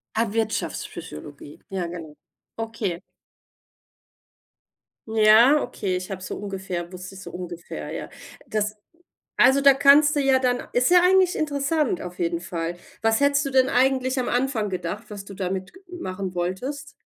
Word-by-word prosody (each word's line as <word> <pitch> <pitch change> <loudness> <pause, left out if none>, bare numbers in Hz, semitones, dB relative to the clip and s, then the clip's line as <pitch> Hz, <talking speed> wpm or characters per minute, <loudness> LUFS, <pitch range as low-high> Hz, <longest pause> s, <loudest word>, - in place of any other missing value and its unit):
Ah, 230 +1 +2
Wirtschaftspsychologie, 145 - -4
ja 185 -3 -2
genau. 165 -3 -8 0.4
Okay. 225 -6 -3 2.1
Ja, 225 +6 +6
okay, 195 -6 -2
ich 185 +2 -5
habe 185 -1 -6
so - - -5
ungefähr 190 -3 -5
wusste 185 +1 -9
ich 190 - -10
so - - -9
ungefähr, 175 -1 -7
ja. - - -5 0.4
Das 215 0 -2 0.6
also 270 +1 +5
da 275 -1 +7
kannst 285 +2 +6
du 290 - +1
ja 270 -1 +4
dann 250 -1 -1
ist 250 +6 +2
ja 355 - +8
eigentlich 370 0 +4
interessant 285 - 0
auf 180 0 -8
jeden 170 0 0
Fall. 170 0 -4 0.3
Was 225 0 +3
hättest 285 0 +3
du - - -2
denn 260 0 +4
eigentlich 260 0 +2
am 245 - -2
Anfang 245 -5 0
gedacht, 185 +4 -4
was 200 -1 -7
du 200 - -10
damit 185 0 -4
ge 375 +2 -17 0.2
machen 185 - -5
wolltest? 265 +11 -3
215 Hz, 155 wpm, -24 LUFS, 185-270 Hz, 2.1 s, ja